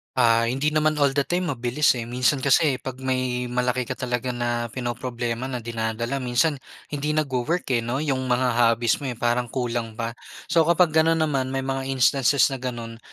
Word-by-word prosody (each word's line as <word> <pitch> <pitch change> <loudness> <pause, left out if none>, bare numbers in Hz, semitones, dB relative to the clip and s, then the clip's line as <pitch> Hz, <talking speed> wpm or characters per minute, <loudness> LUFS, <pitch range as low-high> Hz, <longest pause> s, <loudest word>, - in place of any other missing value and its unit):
Ah, 115 0 +4
hindi 135 +6 0
naman 155 0 +2
all 140 -2 +2
the 140 - +3
time 175 +4 -1
mabilis, 125 +5 +2
eh. 120 - -3
Minsan 125 +3 0
kasi 140 0 +4
'pag 130 0 -7
may 130 -1 -1
malaki 125 0 -1
ka - - -3
talaga 125 -1 -3
na 120 -1 -1
pinoproblema 120 0 -4
na 125 -3 -5
dinadala 115 +3 -2
minsan 135 +4 +1 0.3
hindi 150 +1 -2
nagwo-work, 155 +3 0
eh, 120 - +3
'no, 120 +5 -2
'yung 135 -4 0
mga 125 0 +2
hobbies 115 0 +2
mo, 140 - -5
eh, 125 - -3
parang 120 +1 0
kulang 120 -2 -3
pa. 115 +1 -3 0.4
So 165 -2 +4
kapag 170 -1 +4
gano'n 160 +1 +3
naman 150 -5 0
may 135 0 -2
mga 135 0 -3
instances 135 0 +3
na 135 - -4
gano'n, 120 -2 -6
125 Hz, 185 wpm, -24 LUFS, 120-140 Hz, 0.4 s, Ah